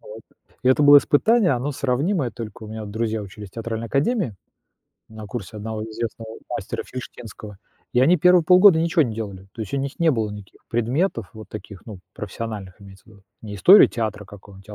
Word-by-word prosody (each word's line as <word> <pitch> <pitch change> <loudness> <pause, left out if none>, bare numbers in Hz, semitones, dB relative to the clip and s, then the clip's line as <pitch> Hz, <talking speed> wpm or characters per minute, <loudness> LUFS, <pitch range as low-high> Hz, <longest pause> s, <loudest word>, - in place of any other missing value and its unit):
Вот, 110 +1 -11 0.4
и 130 - +2
это 130 +3 +4
было 145 0 +9
испытание, 195 - +3
оно 130 +4 -2
сравнимое, 140 +3 -1
только 115 -2 -9
у - - -9
меня 110 0 -6
вот 105 - -8
друзья 110 0 -2
учились 100 +1 -10
в - - -29
театральной 115 0 -5
академии, 145 - 0 0.7
на 110 -1 -10
курсе 105 -1 -7
одного 110 +1 -5
известного 110 0 -6
мастера - - -4
Фильштинского, 110 -5 -10 0.3
и 125 - +3
они 160 +8 +5
первые 180 +1 +4
полгода 180 0 +7
ничего 165 0 +2
не 120 -6 -3
делали. 100 -4 -7
То - - -10
есть 105 +4 -6
у 140 - 0
них 140 +1 -5
не 165 -1 +4
было 110 -6 -1
никаких 105 -2 -12
предметов 120 - -1
вот 110 0 -11
таких, 105 -2 -10
ну, 105 -5 -9
профессиональных, 105 -2 -7
имеется 95 -1 -15
в - - -44
виду, 100 -3 -19 0.2
не 105 -2 -7
история 190 - +8
театра, 110 -3 -4
какого 100 -1 -14
театра, 105 +2 -12
115 Hz, 200 wpm, -22 LUFS, 105-140 Hz, 0.7 s, было